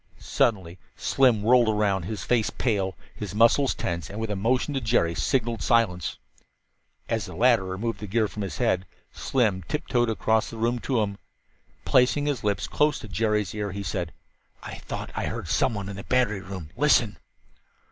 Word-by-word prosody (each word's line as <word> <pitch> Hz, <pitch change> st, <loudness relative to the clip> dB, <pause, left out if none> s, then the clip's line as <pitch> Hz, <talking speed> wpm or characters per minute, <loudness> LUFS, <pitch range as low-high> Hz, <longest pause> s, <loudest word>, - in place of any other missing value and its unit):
Suddenly 95 Hz, -10 st, 0 dB, 0.2 s
Slim 125 Hz, -6 st, +2 dB
whirled 120 Hz, 0 st, +5 dB
around, 100 Hz, -4 st, +1 dB
his 105 Hz, +3 st, -4 dB
face 120 Hz, -3 st, +1 dB
pale, 100 Hz, -6 st, -1 dB, 0.2 s
his 100 Hz, -2 st, -6 dB
muscles 115 Hz, +5 st, +4 dB
tense, 85 Hz, -1 st, -3 dB
and 105 Hz, -, -6 dB
with 110 Hz, -1 st, -3 dB
a -, -, -1 dB
motion 125 Hz, +8 st, 0 dB
to 135 Hz, -, -1 dB
Jerry 110 Hz, -8 st, +2 dB
signaled 115 Hz, +4 st, 0 dB
silence. 100 Hz, -8 st, +1 dB, 0.9 s
As -, -, -1 dB
the -, -, -9 dB
latter 120 Hz, -4 st, +4 dB
removed 100 Hz, +5 st, -3 dB
the 105 Hz, -, -6 dB
gear 110 Hz, +2 st, +1 dB
from 105 Hz, -, -7 dB
his 90 Hz, -8 st, -4 dB
head, 95 Hz, +5 st, +1 dB, 0.2 s
Slim 110 Hz, -8 st, 0 dB
tiptoed 120 Hz, -5 st, 0 dB
across 110 Hz, 0 st, +1 dB
the 115 Hz, -, -8 dB
room 120 Hz, +2 st, 0 dB
to 125 Hz, -2 st, 0 dB
him. 100 Hz, -1 st, -5 dB, 0.7 s
Placing 130 Hz, +3 st, +3 dB
his 145 Hz, -4 st, -1 dB
lips 100 Hz, -7 st, 0 dB
close 150 Hz, -, +2 dB
to -, -, -9 dB
Jerry's 105 Hz, 0 st, 0 dB
ears 105 Hz, -2 st, -4 dB
he 100 Hz, -, -4 dB
said: 90 Hz, -4 st, -3 dB, 0.5 s
"I -, -, -7 dB
thought -, -, -6 dB
I -, -, -1 dB
heard -, -, -5 dB
someone 100 Hz, -3 st, 0 dB
in 100 Hz, -1 st, -6 dB
the 100 Hz, -, -7 dB
battery 120 Hz, -6 st, +1 dB
room. 95 Hz, -6 st, -8 dB
Listen!" 135 Hz, -7 st, +3 dB
110 Hz, 175 wpm, -26 LUFS, 95-120 Hz, 0.9 s, whirled